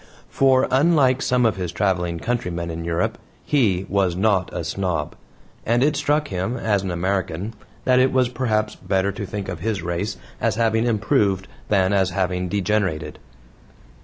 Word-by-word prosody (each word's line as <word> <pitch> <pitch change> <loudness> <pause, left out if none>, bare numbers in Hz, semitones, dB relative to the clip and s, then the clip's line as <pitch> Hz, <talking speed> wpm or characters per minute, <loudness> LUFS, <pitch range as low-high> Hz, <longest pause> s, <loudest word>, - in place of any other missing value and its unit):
For, 130 -1 +4
unlike 135 -2 +4
some 125 -1 +2
of 110 -4 +2
his 90 -3 -3
traveling 90 -3 0
countrymen 85 -5 -2
in 85 0 -5
Europe, 85 0 -1 0.3
he 100 -10 +2
was 95 -3 +1
not 95 -2 +1
a - - -4
snob, 85 -2 -2 0.5
and 120 +3 +2
it 150 +1 +2
struck 145 +1 +1
him 95 +6 -2
as 105 -5 +1
an 95 - -4
American 95 +2 -2 0.3
that 125 -1 +4
it 130 +1 +4
was, 130 -1 +3
perhaps, 110 -4 -1
better 95 +1 -1
to 100 +1 -6
think 100 -1 -5
of 90 -3 -5
his 105 +2 -2
race 85 +4 -2 0.2
as - - +1
having 115 +1 +2
improved 100 -3 +1 0.2
than 95 -1 +3
as 95 -2 +3
having 90 -1 -1
degenerated. 100 -4 -1
100 Hz, 160 wpm, -22 LUFS, 90-120 Hz, 0.5 s, For